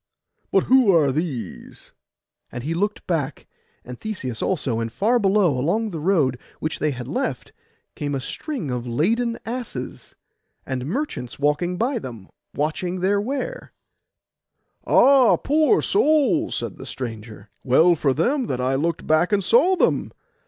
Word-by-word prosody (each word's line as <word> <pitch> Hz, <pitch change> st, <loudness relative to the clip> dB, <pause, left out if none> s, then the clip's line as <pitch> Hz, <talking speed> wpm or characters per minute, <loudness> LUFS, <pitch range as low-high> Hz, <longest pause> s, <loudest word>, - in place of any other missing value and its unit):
But 195 Hz, -, +3 dB
who 255 Hz, -5 st, +5 dB
are 155 Hz, -6 st, +4 dB
these?' 135 Hz, -, -5 dB, 0.6 s
and 120 Hz, -1 st, -6 dB
he 155 Hz, +4 st, -2 dB
looked 205 Hz, +5 st, -2 dB
back, 150 Hz, -5 st, -2 dB, 0.4 s
and 125 Hz, 0 st, -9 dB
Theseus 130 Hz, -, -5 dB
also; 135 Hz, -11 st, -1 dB
and 115 Hz, 0 st, -3 dB
far 230 Hz, -, +2 dB
below, 195 Hz, -, +3 dB
along 205 Hz, -, 0 dB
the 165 Hz, -, -5 dB
road 150 Hz, -7 st, +1 dB, 0.2 s
which 155 Hz, -, -3 dB
they 155 Hz, -, +1 dB
had 125 Hz, -4 st, -5 dB
left, -, -, -3 dB, 0.4 s
came 145 Hz, -1 st, -3 dB
a -, -, -1 dB
string 185 Hz, -, -5 dB
of 125 Hz, 0 st, -4 dB
laden 230 Hz, -, 0 dB
asses, 225 Hz, -, -6 dB, 0.5 s
and 130 Hz, 0 st, -4 dB
merchants 225 Hz, -, -4 dB
walking 150 Hz, +5 st, 0 dB
by 240 Hz, +4 st, 0 dB
them, 115 Hz, -, -9 dB, 0.3 s
watching 175 Hz, +5 st, -2 dB
their 200 Hz, +2 st, +2 dB
ware. 280 Hz, -, -4 dB, 1.1 s
'Ah, 270 Hz, -3 st, +6 dB
poor 310 Hz, +7 st, +2 dB
souls!' 315 Hz, -3 st, +2 dB
said -, -, -4 dB
the -, -, -9 dB
stranger. 110 Hz, -4 st, -8 dB
'Well 160 Hz, +7 st, +5 dB
for 145 Hz, -4 st, +1 dB
them 250 Hz, -, +1 dB
that 125 Hz, -, -2 dB
I 130 Hz, +1 st, 0 dB
looked 165 Hz, +5 st, -1 dB
back 155 Hz, +5 st, +2 dB
and 200 Hz, -1 st, +2 dB
saw 270 Hz, -, +4 dB
them! -, -, +1 dB
170 Hz, 150 wpm, -22 LUFS, -, 1.1 s, Ah